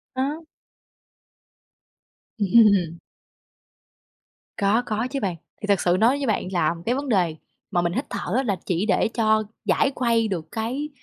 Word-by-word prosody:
À. 280 +4 -1 2.0
Ừm. 200 -5 +4 1.6
Có 205 +4 +2
có 220 +2 -1
chứ 275 - -3
bạn, 185 -5 -2 0.2
thì 205 - -5
thật 200 -2 +2
sự 175 0 +2
nói 245 +5 +4
với 275 - -2
bạn 210 -4 0
là 170 -2 +1
cái 245 - +2
vấn 280 +1 -3
đề 180 -8 +1 0.3
mà 175 - +1
mình 170 0 0
hít - - -2
thở 200 0 -3
á 265 - +2
là 200 -7 -1
chỉ 180 +3 0
để 195 0 +2
cho 220 -1 +3 0.2
giải 275 - +2
khuây 230 -3 +1
được 170 -5 -3
cái 250 +7 -3
215 Hz, 160 wpm, -23 LUFS, 185-240 Hz, 2.0 s, Ừm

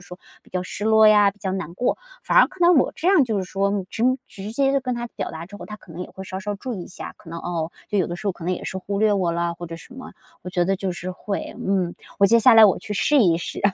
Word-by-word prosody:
说 180 - -10 0.2
比 - - -22
较 185 -1 -2
失 195 +3 -6
落 220 0 +6
呀， 210 -1 +6
比 200 - -23
较 190 -1 -3
难 175 -3 -5
过。 245 +7 0 0.2
反 - - +3
而 - - +8
看 375 - -18
到 345 0 +6
我 280 -7 +3
这 335 - -4
样 375 -8 +5
就 220 -4 -1
是 190 - -2
说 195 +1 -1
直 225 - -1 0.2
直 200 +2 -8
接 275 +2 +2
跟 255 -1 -2
他 240 0 -4
表 - - -5
达 160 +1 -7
之 205 +3 -11
后， - - -9
他 210 - -8
可 190 - -19
能 170 - -8
也 - - -9
会 190 - -9
稍 190 0 -6
稍 205 +1 -4
注 240 +5 -5
意 185 - -6
一 - - -9
下， 185 - -8
可 165 - -16
能， 170 - -5
哦， 170 -1 -3 0.2
就 205 - 0
有 185 - +2
的 175 - -4
时 200 +4 -7
候 - - 0
可 170 - -11
能 180 - 0
也 - - -8
是 190 - -4
忽 200 +1 -4
略 215 -1 +4
我 185 -4 +1
了 170 0 -1
或 175 +1 -8
者 165 - -7
什 245 +9 -14
么。 260 - -10 0.3
我 - - -7
觉 175 -1 +1
得 195 +2 +1
就 190 -1 -3
是 180 +1 -5
会 195 +2 -5
嗯， 190 -3 0 0.3
我 200 - +5
接 230 +4 +5
下 230 +1 +6
来 225 -1 +9
我 200 - +4
去 210 - -7
试 290 +8 +3
一 180 -9 +4
试。 170 - -5
195 Hz, 330 characters per minute, -23 LUFS, 180-220 Hz, 0.3 s, 来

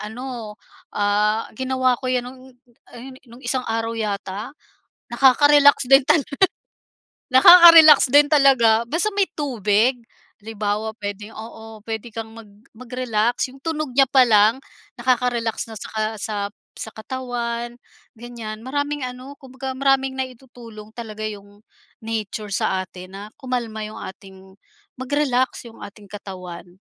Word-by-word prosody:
ano, 225 -1 -7 0.4
ah, 210 +2 0
ginawa 260 +1 0
ko 255 - -3
yun 250 -1 0
no'ng 255 +1 -11 0.5
ayun, 255 +2 -11
nung 240 +2 -15
isang 260 -1 -1
araw 225 0 -2
yata? 210 0 -4 0.6
Nakaka-relax 285 +2 +5
din 270 +1 +7
tala 300 0 +2 1.1
nakaka-relax 325 +1 +9
din 290 0 +6
talaga 260 -6 +4
basta 345 - 0
may 400 - +3
tubig. 240 -3 0 0.4
Halimbawa, 215 0 -3
puwedeng 205 0 -7
oo, 220 -1 -11
puwede 225 +1 -6
kang 225 0 -6
mag 230 -1 -12 0.3
mag-relax. 245 -1 -2
'Yong 270 +1 -16
tunog 310 -3 -3
niya 275 0 +6
pa 265 +1 +4
lang 220 +3 +4 0.4
nakaka-relax 240 -2 -1
na - - -8
saka 220 +1 -4
sa 205 -2 -3 0.3
sa 220 - -7
katawan, 240 0 -5 0.4
ganyan. 225 -2 -8
Maraming 285 +2 -3
ano, 255 +2 -7
kumbaga 265 0 -7
maraming 270 0 +1
naitutulong 240 -4 -9
talaga 215 -2 -7
'yong 205 0 -9 0.4
nature 215 -2 -4
sa 185 -1 -1
atin 185 +1 -13
na - - -8 0.2
kumalma 240 -4 -4
'yong 215 0 -7 0.2
ating 190 0 -16 0.6
mag-relax 260 -2 -1
'yong 230 - -14
ating 205 +1 -12
katawan, 185 -4 -9
235 Hz, 130 wpm, -21 LUFS, 215-260 Hz, 1.1 s, nakaka-relax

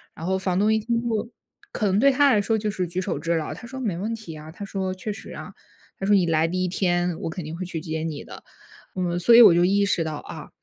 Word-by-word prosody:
然 165 - -7
后 190 +1 0
房 185 -1 -1
东 215 +2 +3
一 220 - +2
听 230 +2 -1
就 230 -1 -2 0.4
可 215 - -2
能 195 +2 +2
对 275 +3 +6
他 280 +1 +4
来 210 - +3
说 220 +2 0
就 210 -1 -2
是 185 -2 -2
举 180 +2 -4
手 150 - -3
之 170 +2 0
劳， 155 -2 -2
他 240 - -10
说： 265 +2 -7
“没 205 -8 -1
问 220 +5 -3
题 175 -8 -9
啊。” 155 +1 -10
他 200 +4 -8
说： 190 -1 -3
“确 210 +3 -5
实 220 - -10
啊。” - - -9 0.5
他 195 - -3
说：” 205 - +5
你 185 - +3
来 160 0 +2
第 185 +2 -1
一 185 - 0
天， 175 -2 0
我 - - -3
肯 170 +1 -6
定 155 - -6
会 185 - -4
去 165 -2 -5
接 160 -1 -4
你 155 -3 -4
的。” - - -12 0.5
嗯， 175 -1 -1
所 230 +7 +6
以 240 - +10
我 170 - +8
就 175 - +3
意 200 +2 +3
识 170 -4 +1
到， 155 -1 -4
啊， - - -9
185 Hz, 305 characters per minute, -24 LUFS, 170-215 Hz, 0.5 s, 以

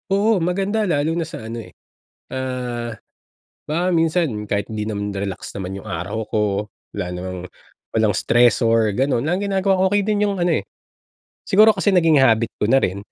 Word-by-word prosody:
Oo 205 +2 +3
maganda, 195 +5 0
lalo 150 -2 +1
na 165 -1 -1
sa 115 -8 -8
ano, 115 +1 -5
eh, - - -14 0.6
ah 125 -2 -3 0.7
baka 170 +4 0
minsan 160 -10 +1
kahit 100 -1 -1
'di 105 -1 -3
naman, 105 -1 -3
relax 100 -1 -5
naman 95 0 -5
yung - - -12
araw 100 +6 -4
ko, 110 - -1 0.5
wala 100 -3 -3
namang 90 +1 -5 0.6
walang 110 -2 +2
stressor, 115 -2 +3
gano'n. 130 -2 +1
Ang 180 +4 0
ginagawa 195 -1 +1
ko - - +2
okey 205 0 +3
din 210 -1 +1
yung 200 -1 -1
ano, 175 0 +2
eh, - - -25 0.8
siguro 215 +3 +6
kasi 205 - +1
naging 165 -4 +5
habit 115 -3 +3
ko - - +1
na 135 - +6
rin, 95 +1 -1
125 Hz, 175 wpm, -21 LUFS, -, 0.8 s, siguro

